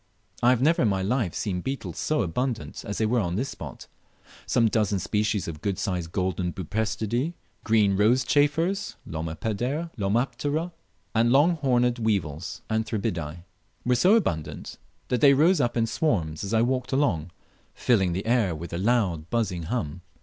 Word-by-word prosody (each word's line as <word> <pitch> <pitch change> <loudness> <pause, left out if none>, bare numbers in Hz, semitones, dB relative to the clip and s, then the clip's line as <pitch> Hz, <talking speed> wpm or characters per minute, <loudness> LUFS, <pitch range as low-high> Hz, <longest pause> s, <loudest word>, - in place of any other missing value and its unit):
I 120 - +5
have 125 0 +3
never 165 +3 +4
in 115 - +4
my 95 -2 0
life 110 -3 0
seen 90 -4 -2
beetles 135 +5 -4
so 155 -6 +1
abundant 115 +6 -3
as 105 -3 -4
they 110 - +1
were 120 +3 +2
on 90 -4 -1
this 130 +7 -1
spot. - - -8 0.6
Some 115 - +3
dozen 105 -2 +1
species 105 0 -1
of 80 -2 -6
good 100 -1 -1
sized 90 -3 -2
golden 90 -1 -1
Buprestidae, 110 - -2 0.3
green 105 -3 +3
rose 115 +6 +4
chafers 155 +9 +1
(Lomaptera), 120 - -2 0.4
and 115 +1 +3
long 155 +6 +4
horned 125 -4 +2
weevils 90 -8 -2
(Anthribidae), 90 -7 -2 0.4
were 125 - +3
so 180 - +5
abundant 80 - -2 0.3
that 125 - 0
they 140 -2 +7
rose 165 +4 +4
up 120 -1 0
in 115 - +3
swarms 90 - -1
as 100 - -4
I 115 0 +3
walked 125 0 -1
along, 100 - +1 0.5
filling 95 -8 +2
the 95 +3 -3
air 115 -7 +2
with 85 +2 -7
a 85 - -2
loud 95 -7 +1
buzzing 100 -8 -1
hum. 90 -9 -3
110 Hz, 160 wpm, -26 LUFS, 90-125 Hz, 0.6 s, they